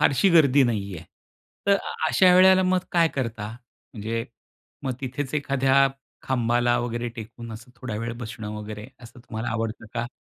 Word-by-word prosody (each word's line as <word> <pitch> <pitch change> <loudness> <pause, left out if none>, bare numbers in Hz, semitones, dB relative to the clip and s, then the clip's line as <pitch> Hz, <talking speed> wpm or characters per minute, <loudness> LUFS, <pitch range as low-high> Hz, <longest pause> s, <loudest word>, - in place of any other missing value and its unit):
फारशी 140 +8 +4
गर्दी 145 -5 +6
नाही 100 -5 -1
आहे, 80 - -10 0.6
तर 200 0 +5 0.3
अशा 180 -1 +5
वेळेला 185 +1 +7
मग 185 0 +3
काय 170 -2 +4
करता? 115 -5 -3 0.5
म्हणजे 115 +1 -3 0.6
मग 135 -2 -1
तिथेच 135 +2 -4
एखाद्या 135 -1 +3 0.4
खांबाला 120 -1 +2
वगैरे 120 0 -2
टेकून 115 +1 -8
असं 110 +2 -11
थोडा 120 -3 -5
वेळ 115 0 -3
बसणं 110 -2 -6
वगैरे, 105 +1 -7
असं 120 0 -13
तुम्हाला 110 0 -5
आवडतं 115 -1 -3
का? 120 0 -1
120 Hz, 155 wpm, -25 LUFS, 115-140 Hz, 0.6 s, वेळेला